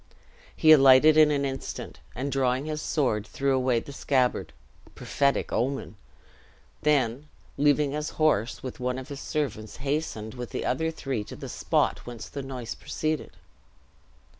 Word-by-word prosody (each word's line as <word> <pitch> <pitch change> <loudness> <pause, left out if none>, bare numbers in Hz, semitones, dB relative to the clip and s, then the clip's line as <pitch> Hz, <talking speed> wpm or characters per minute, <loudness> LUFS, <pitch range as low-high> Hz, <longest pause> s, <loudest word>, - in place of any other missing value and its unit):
He 155 - +5
alighted 135 +1 +8
in 155 -1 +7
an 140 -1 +1
instant, 135 -1 -5 0.2
and 135 +3 -3
drawing 130 0 +1
his 155 0 -3
sword, 110 -11 0
threw 135 -1 0
away 130 -2 +2
the 140 - -10
scabbard 130 -2 0 0.4
(prophetic 140 -1 0
omen!), 135 -2 -1 0.9
then, 140 -2 +1 0.3
leaving 145 0 +3
his 150 +1 -3
horse 120 -7 +1
with 130 - -6
one 125 0 -1
of 130 +2 -8
his 140 -1 -6
servants 115 -8 -3
hastened, 135 -6 -3
with 125 -1 -6
the - - -4
other 160 +6 0
three, 135 -8 -3
to - - -9
the - - -8
spot - - 0
whence 115 -3 -7
the 140 - -5
noise 130 -3 -6
proceeded. 155 -1 -3
135 Hz, 150 wpm, -27 LUFS, 125-150 Hz, 0.9 s, alighted